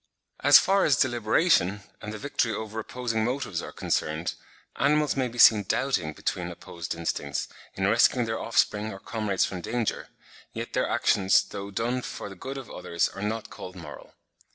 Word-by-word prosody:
As - - +8
far 195 0 +3
as 145 - +4
deliberation, 115 - +2 0.2
and 105 - -6
the 110 - -6
victory 125 -2 -1
over 110 0 -5
opposing 115 -1 -2
motives 115 -8 -2
are - - -7
concerned, 80 +3 -2 0.4
animals 150 0 +2
may 130 -2 +1
be 120 0 -10
seen 110 -3 +8
doubting 95 - -1
between - - -3
opposed 85 -1 -7
instincts, 85 0 -3 0.3
in 95 - -1
rescuing 120 +2 +4
their 110 0 -2
offspring 110 -2 +1
or 95 - -7
comrades 105 -3 -1
from 90 -2 -5
danger; 115 +3 -2 0.5
yet - - -6
their - - +1
actions, 95 -2 +3
though 100 0 -7
done 120 +5 -1
for 105 - -6
the 95 - -10
good 135 +8 -6
of 135 -3 -7
others, 90 -3 -1
are 95 - -9
not 110 +2 -3
called 90 0 -9
moral. 85 -5 -11
110 Hz, 175 wpm, -27 LUFS, 95-125 Hz, 0.5 s, As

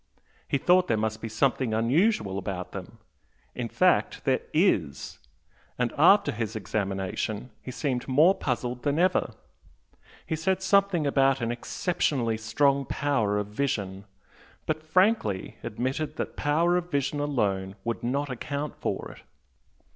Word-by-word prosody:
He - - +1
thought 180 +6 +4
there 115 - +1
must 110 0 -2
be 115 - -4
something 120 0 +1
unusual 115 - +2
about 90 -2 -5
them. 100 +3 -8 0.6
In - - -4
fact - - +2
there - - +3
IS! - - +1 0.6
and 125 -1 0
after 200 +7 +5
his 115 0 -4
examination 100 +3 -3
he - - -9
seemed 125 -1 -2
more 150 +8 +5
puzzled 125 -5 -3
than 145 +2 0
ever. 185 +2 +2 0.9
He 160 - -2
said 190 +4 0
something 195 -4 +3
about 135 -1 +3
'an 115 -1 -1
exceptionally 120 -2 -1
strong 140 +5 +2
power 115 -8 0
of 105 - -1
vision,' 100 -5 -2 0.6
but 155 0 -1
frankly 160 - +1
admitted 130 +7 -3
that - - -4
power 165 +4 +2
of 175 0 -3
vision 140 -1 -1
alone 100 -10 -1
would 115 0 -3
not 140 +4 -1
account 140 +4 -4
for - - -3
it. - - -14
130 Hz, 140 wpm, -27 LUFS, 110-155 Hz, 0.9 s, after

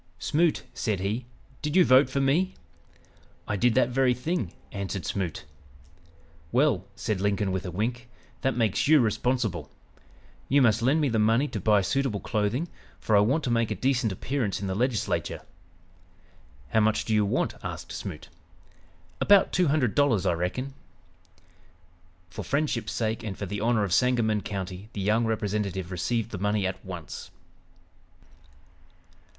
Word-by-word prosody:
"Smoot," 160 - +1
said 105 -6 -1
he, 110 +5 -2 0.3
"did 150 +1 -2
you 185 -2 +6
vote 130 +1 +6
for 140 - -1
me?" 155 +8 +2 0.9
"I 105 - -1
did 120 +3 +2
that 130 -1 +4
very 125 0 +2
thing," 125 - -2 0.2
answered 100 -2 -4
Smoot. 90 -6 -3 1.1
"Well," 125 -7 +2
said 105 -3 -2
Lincoln 100 -1 +1
with 95 0 -3
a - - -4
wink, 120 +6 -3 0.3
"that 135 -2 0
makes 110 -1 +1
you 155 0 +7
responsible. 110 - 0 0.8
You 140 - +5
must 110 -2 +3
lend 135 +7 +3
me 145 - +2
the 115 -2 +1
money 115 +6 +3
to 110 - -4
buy 105 +1 +4
suitable 110 +2 0
clothing, 115 - -1 0.3
for 110 - +1
I - - +7
want 130 +10 +2
to 125 - -1
make 115 -1 +2
a 110 - -1
decent 125 +1 +1
appearance 115 +1 -2
in 100 - -4
the 95 - -1
Legislature." 120 +2 -1 1.3
"How 110 - +3
much 110 0 +2
do 110 - -1
you 105 -1 +4
want?" 100 - 0
asked - - -6
Smoot. - - -6 0.9
"About 200 -2 +5
two 180 -2 +3
hundred 140 -6 +2
dollars, 125 -10 +2
I 90 - +3
reckon." 90 +11 -3 1.6
For 100 - -6
friendship's 140 -5 -1
sake 110 +1 -1
and 105 -4 -5
for 100 - -4
the 100 +2 -4
honor 115 -1 +2
of 95 -4 -1
Sangamon 115 -3 +2
County 95 0 -6
the 100 - -4
young 110 +4 +2
representative 100 -4 -2
received 115 +5 -1
the 100 - -5
money 105 0 0
at 95 0 -3
once. 90 -4 -8
110 Hz, 155 wpm, -27 LUFS, 100-130 Hz, 1.6 s, you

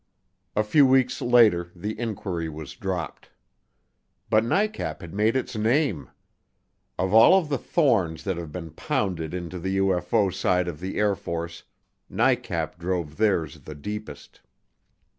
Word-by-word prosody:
A 105 - +3
few 135 +6 +5
weeks 130 -1 +2
later 110 -8 +4
the 105 +5 -5
inquiry 95 -8 -3
was 75 -2 -8
dropped. 90 0 -5 1.0
But 110 0 +4
NICAP 210 - -1
had 85 -3 -9
made 105 +4 +2
its 130 -2 -2
name. 110 - +1 0.9
Of 95 +1 -1
all 115 +12 +8
of 165 -6 -1
the 140 -4 0
thorns 110 - +1
that 95 -2 -1
have 85 -3 -6
been 85 -1 -7
pounded 90 - -2
into 90 0 -5
the 95 +2 -2
UFO 95 0 +1
side 90 -1 +1
of 80 -4 -5
the 95 +2 -5
Air 105 -1 +3
Force, 85 -1 -6 0.4
NICAP 85 - 0
drove 85 -3 -3
theirs 95 -9 +1
the 75 - -10
deepest. 105 -1 -8
95 Hz, 140 wpm, -25 LUFS, 85-110 Hz, 1.0 s, all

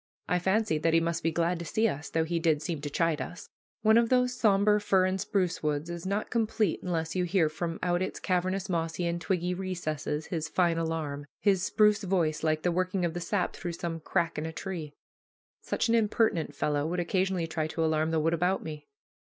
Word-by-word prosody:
I 180 - +2
fancied 190 -3 +1
that 165 0 +3
he - - +6
must 165 0 -1
be 165 - +1
glad 170 +1 0
to 170 - -5
see 220 +8 +2
us, 145 -6 -4
though 160 - +1
he 165 +1 -1
did 160 -2 +1
seem 160 -2 -3
to 145 - -4
chide 165 +1 +1
us. 180 - -7 0.3
One 220 +1 +6
of 235 -1 +1
those 250 -1 +3
somber 210 -3 +3
fir 195 -2 +3
and 185 0 0
spruce 185 -5 0
woods 150 +2 -1
is 170 +1 -5
not 200 +2 -2
complete 220 -5 +1
unless 165 -2 -2
you 180 - +1
hear 175 -3 +2
from 165 +1 -4
out 175 0 +1
its 185 - -3
cavernous 185 +1 0
mossy 165 -1 -1
and 170 0 -1
twiggy 180 0 0
recesses 170 -5 -3
his 160 -3 -3
fine 170 0 +2
alarum 155 -3 -3
his 195 -3 +3
spruce 210 +2 +3
voice, 170 -5 +1
like 155 -1 +1
the 175 - +2
working 185 +1 0
of 165 - -1
the 175 - -4
sap 195 +2 -1
through 175 -2 -4
some 165 -1 -4
crack 165 0 -1
in 155 - -3
a - - -4
tree. 165 -4 -6 0.7
Such - - -1
an 230 - +2
impertinent 215 -9 +1
fellow 145 +1 0
would 175 +2 -2
occasionally 185 0 0
try 160 -1 -2
to 160 +1 -1
alarm 155 0 +1
the 160 -1 +1
wood 165 +2 +1
about 180 +3 +1
me. 150 -2 -7
170 Hz, 215 wpm, -29 LUFS, 160-190 Hz, 0.7 s, he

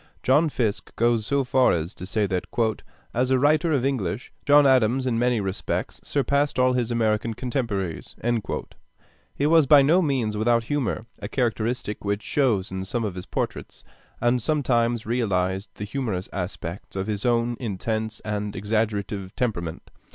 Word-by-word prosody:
John 150 +5 +4
Fiske 115 -7 -2
goes 115 -2 +2
so 140 -1 +2
far 130 0 +3
as 85 +3 -2
to 90 - -8
say 105 +1 +1
that 95 -2 -2 0.7
"as 125 +2 +1
a 130 - +4
writer 155 +5 +3
of 135 -4 +1
English, 120 -5 -2
John 145 0 +7
Adams 130 -1 +3
in 120 -3 0
many 120 -1 +2
respects 95 -2 -3
surpassed 140 0 +1
all 130 0 +4
his 125 -2 0
American 115 -1 0
contemporaries." 115 - -3 1.2
He 140 - 0
was 160 -2 +5
by 145 -1 +8
no 165 +7 +4
means 130 -9 0
without 115 +2 +2
humor, 125 -4 -2
a - - -5
characteristic 115 -2 -1
which 100 +1 -1
shows 115 -10 +1
in 95 0 -3
some 115 +5 -2
of 105 -4 -2
his 90 0 -8
portraits, - - -4 0.4
and 120 +1 +2
sometimes 120 -5 +1
realized 95 -5 0
the - - -6
humorous 105 -4 -3
aspects 90 -1 -5
of 95 0 -2
his 105 -1 -3
own 120 0 +1
intense 110 0 -3
and 105 -1 -3
exaggerative 105 -2 -2
temperament. 85 -10 -3
115 Hz, 160 wpm, -25 LUFS, 100-130 Hz, 1.2 s, by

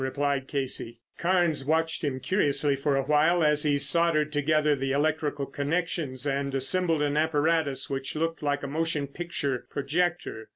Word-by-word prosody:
replied 140 0 -1
Casey. 130 -4 -2 0.2
Carnes 175 -5 +1
watched 160 +4 0
him 135 -3 -1
curiously 145 -5 +1
for 140 +1 0
a 135 - +1
while 155 +4 +3
as 150 -1 +3
he 145 -2 +2
soldered 155 0 +1
together 150 0 +2
the 135 0 -2
electrical 145 0 0
connections 145 -2 -2
and 140 -1 -1
assembled 160 +3 +2
an 145 0 0
apparatus 155 -2 +1
which 135 +1 -4
looked 165 +1 -2
like 145 -1 -1
a - - -3
motion 155 0 -1
picture 140 -4 -4
projector. 160 -5 -2
145 Hz, 155 wpm, -27 LUFS, 140-160 Hz, 0.2 s, while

